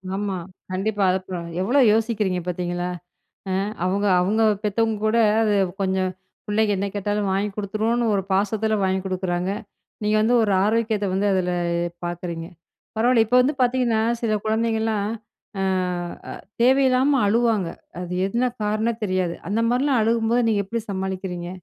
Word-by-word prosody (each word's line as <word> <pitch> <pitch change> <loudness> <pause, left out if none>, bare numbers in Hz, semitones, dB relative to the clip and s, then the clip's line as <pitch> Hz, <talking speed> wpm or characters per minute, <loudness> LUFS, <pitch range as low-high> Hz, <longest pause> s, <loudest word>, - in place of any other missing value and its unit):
ஆமா. 200 -2 -2 0.3
கண்டிப்பா 200 +2 -1
அத 185 - +1 0.4
எவ்வளோ 245 +9 +2
யோசிக்கிறீங்க 215 -5 0
பார்த்தீங்களா, 175 0 -2 0.6
ஆ - - 0 0.3
அவங்க 200 +3 0 0.2
அவங்க 210 +5 +1 0.2
பெத்தவங்க 220 +1 0
கூட 215 +2 +2 0.2
அது 215 -2 +2 0.3
கொஞ்சம் 190 -1 0 0.4
"பிள்ளைங்க 210 0 +2
என்ன 200 +1 -1
கேட்டாலும் 205 0 -1
வாங்கிக் 195 +1 -1
குடுத்துருவோம்"னு, 220 +3 0
ஒரு 195 - 0
பாசத்தில 215 +3 +1
வாங்கிக் 190 0 0
குடுக்குறாங்க. 185 0 -1 0.5
நீங்க 210 +1 +2
வந்து 235 +3 +3
ஒரு 205 - +1
ஆரோக்கியத்த 220 -1 +1
வந்து 195 +2 +1
அதில 180 -1 0 0.5
பார்க்குறீங்க. 170 -1 -5 0.5
பரவாயில்ல, 230 0 +4
இப்போ 250 +3 +4
வந்து 270 +4 +1
பார்த்தீங்கன்னா, 245 -3 +2 0.2
சில 225 -2 0
குழந்தைங்கள்லாம் 220 -1 0 0.5
ஆ - - +1 1.0
தேவையில்லாம 265 +2 +4
அழுவாங்க, 225 -3 +2 0.3
அது 180 0 -5
என்ன 235 +5 0 0.2
காரணம்? 220 +2 -1
தெரியாது. 185 -3 0 0.2
அந்த 215 +3 0
மாதிரிலாம் 255 +1 +2
அழுகும்போது 230 +2 +2
நீங்க 205 -2 +2
எப்படி 230 +4 -3
சமாளிக்கிறீங்க? 190 -2 -4
210 Hz, 135 wpm, -23 LUFS, 190-230 Hz, 1.0 s, பரவாயில்ல